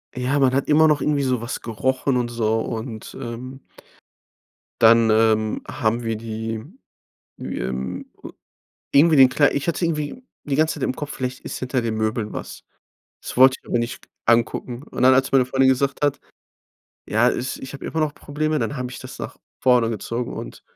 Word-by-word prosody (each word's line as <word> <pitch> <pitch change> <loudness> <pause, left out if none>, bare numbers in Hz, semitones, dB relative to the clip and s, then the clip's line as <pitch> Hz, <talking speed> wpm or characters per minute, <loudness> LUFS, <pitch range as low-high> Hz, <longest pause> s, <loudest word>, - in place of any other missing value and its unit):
Ja, 130 +3 0
man 130 -2 +3
hat 135 +1 0
immer 155 +1 +6
noch 150 -1 +2
irgendwie 145 -2 +1
sowas 125 -2 -2
gerochen 130 +4 -1
und 120 -1 -1
so 115 -1 0
und, 110 -1 -5
ähm 130 +1 -7 1.2
dann, 115 0 +6
ähm, 110 0 +2
haben 115 +2 -1
wir 115 -1 -1
die, 110 0 -5 0.8
ähm, 65 +1 -4 0.2
äh - - -6 0.7
irgendwie 155 +3 +6
den 135 -2 +8
Klei 145 +3 +3
ich 140 +3 -2
hatte 170 - -1
irgendwie 155 - -3 0.2
die 140 -2 -1
ganze 155 +1 +2
Zeit 145 - -5
im 130 - -1
Kopf, 145 +1 -5
vielleicht 130 0 -4
ist - - -6
hinter 130 0 -1
den 115 -1 -2
Möbeln 110 0 -1
was. - - -7 0.6
Das - - -7
wollte 130 +1 +7
ich - - -20
aber 120 - +1
nicht 115 +1 -4 0.2
angucken. 120 +1 +1
Und - - -5
dann, 130 +1 +7
als 135 0 +2
meine 130 -2 +4
Freundin 130 +1 +3
gesagt 135 +2 +1
hat: 145 -1 +1 0.9
„Ja, 115 +3 +3
es 130 - -3
ich 135 - -9
habe 140 - -9
immer 160 - -3
noch 150 -2 0
Probleme“, 155 +1 -2
dann 145 - -2
habe 125 -1 -4
ich - - -8
das - - -10
nach - - -6 0.3
vorne 125 -3 +4
gezogen 115 +2 -4
und - - -8
125 Hz, 185 wpm, -22 LUFS, 115-140 Hz, 1.2 s, den